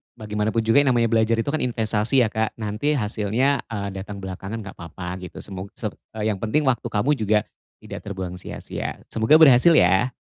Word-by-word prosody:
bagaimana 105 -1 -2
pun 115 0 0
juga 115 +5 +4
yang 140 - +2
namanya 115 -1 +2
belajar 115 0 +3
itu 115 +5 -1
kan 155 - -1
investasi 115 +1 +2
ya, - - +2
Kak. 110 0 -1
Nanti, 110 +7 -1
hasilnya, 115 +4 0
eee, 100 -3 -4
datang 100 +1 -8
belakangan 95 +3 -6
enggak 100 - -10
papa 90 +2 -7
gitu. 90 0 -10
Semog 95 0 -7
se - - -3 0.3
eee, 110 0 0
yang 100 - -4
penting 110 +9 0
waktu 125 -3 +1
kamu 115 +6 0
juga 105 -1 +2 0.4
tidak - - -8
terbuang 95 -3 -5
sia-sia. - - -6
Semoga 115 +8 +5
berhasil 155 +1 +7
ya! 95 +7 +4
110 Hz, 195 wpm, -23 LUFS, 100-120 Hz, 0.4 s, berhasil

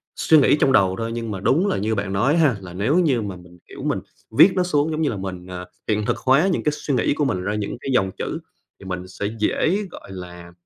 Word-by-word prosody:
suy 160 - +4
nghĩ 145 - +5
trong 135 - +3
đầu 95 -6 +4
thôi, 115 0 -3
nhưng 115 -2 -4
mà 95 - -4
đúng 165 - +2
là - - 0
như 110 +3 -1
bạn 100 -1 -3
nói 120 +9 +2
á - - +2
ha, 140 -8 +3
là 90 -2 -9
nếu 130 - +1
như 140 -9 +2
mà 100 -3 -5
mình, 90 0 -15
kiểu, - - -10
mình - - 0 0.4
viết 195 - +9
nó 185 - +2
xuống 155 -3 +1
giống 155 - -2
như 150 - +2
là 105 - -3
mình, 95 -1 -6
ờ, 90 0 -7 0.2
hiện 105 -1 0
thực - - 0
hóa 140 +8 +3
những - - -1
cái 150 - +2
suy 150 -1 -3
nghĩ 125 - +2
của 145 0 0
mình 90 -8 -1
ra 105 +3 -2
những 105 +2 -3
cái - - -5
dòng 95 -5 +2
chữ, - - -3 0.4
thì 95 - -13
mình 90 -1 -5
sẽ 95 +2 -6
dễ, 160 - +1
gọi 100 - -11
là, 90 -1 -9
105 Hz, 275 wpm, -22 LUFS, 95-145 Hz, 0.4 s, viết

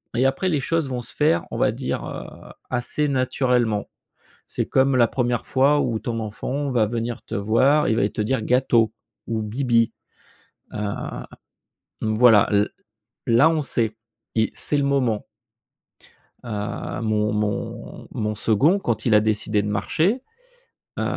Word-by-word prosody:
et 125 - +2
après 135 +8 +1
les 155 -5 +1
choses 160 0 -1
vont 125 -1 -3
se 120 - -9
faire, 155 +2 +2
on - - -4
va - - +2
dire, - - -3
heu, - - -9 0.2
assez 130 +4 -1
naturellement. 125 -5 +1 0.6
C'est - - -2
comme 135 0 +2
la 120 -2 +5
1re 120 -2 -1
fois 140 +2 +3
où 115 -3 -1
ton 115 0 -3
enfant 130 +6 -3
va 115 -3 +3
venir 115 +1 -3
te - - -6
voir 130 +9 +3
et - - +2
il 110 - +1
va 100 - +2
te 105 - -4
dire: 120 +3 0
«gâteau» 120 -3 +2 0.3
ou 115 -1 -1
«bibi», 115 0 +1 0.8
heu, 105 - -4 1.2
voilà 110 -1 +5
l 105 +1 +2 0.6
là, 120 +7 +5
on 160 -1 +1
sait 115 -4 -1 0.4
i 110 -2 +2
c'est 145 - +1
le 140 - +1
moment. 130 -6 +1 1.2
Heu, 105 +1 -4
mon 105 -1 +1
mon 105 -1 -3
mon 105 0 -2
2nd 135 - +3
quand 120 - -2
il 115 - +4
a 105 - +7
décidé 105 -1 +1
de 105 - -3
marcher, 160 - 0 0.8
heu, - - -1
120 Hz, 155 wpm, -23 LUFS, 110-135 Hz, 1.2 s, a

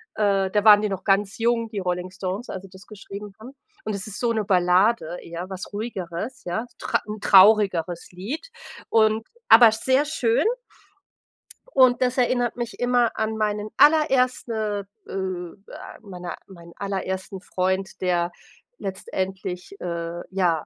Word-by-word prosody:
Äh, 195 -2 +1
da 210 0 +1
waren 210 -1 +8
die 210 - -1
noch 190 -1 -4
ganz 195 0 +1
jung, 230 0 +1
die 210 -3 -4
Rolling 180 0 -2
Stones, 190 +4 -5
als 190 - -6
die 195 - -12
das 190 0 -15
geschrieben 205 -1 -9
haben. 235 +4 -10 0.3
Und 215 - -3
es 200 +1 -5
ist 205 - -7
so 240 -1 +1
'ne 220 -2 0
Ballade 180 0 +2
eher, 170 +2 -7
was 190 -1 -7
Ruhigeres, 205 +1 -5
ja. 220 +7 -2
Tr - - 0
'n 210 0 -6
traurigeres 190 -5 +4
Lied 230 - -6 0.4
und 220 0 +3 0.2
aber 230 0 +9
sehr 260 +5 +2
schön. 245 -7 +1 1.3
Und 255 -1 +5
das 255 0 +1
erinnert 245 -1 +1
mich 240 -1 -5
immer 245 -1 +2
an 220 0 -1
meinen 210 0 -1
allererste, 250 -9 +2 0.2
äh, - - -10
äh 185 -1 -4 0.4
meine 180 -4 -7
meinen 170 -3 -14
allerersten 190 -1 -4
Freund, 190 0 -2
der 175 -1 +1 0.5
letztendlich, 190 -1 -5
äh, 170 0 -4
ja, 175 -5 0
200 Hz, 150 wpm, -24 LUFS, 185-225 Hz, 1.3 s, aber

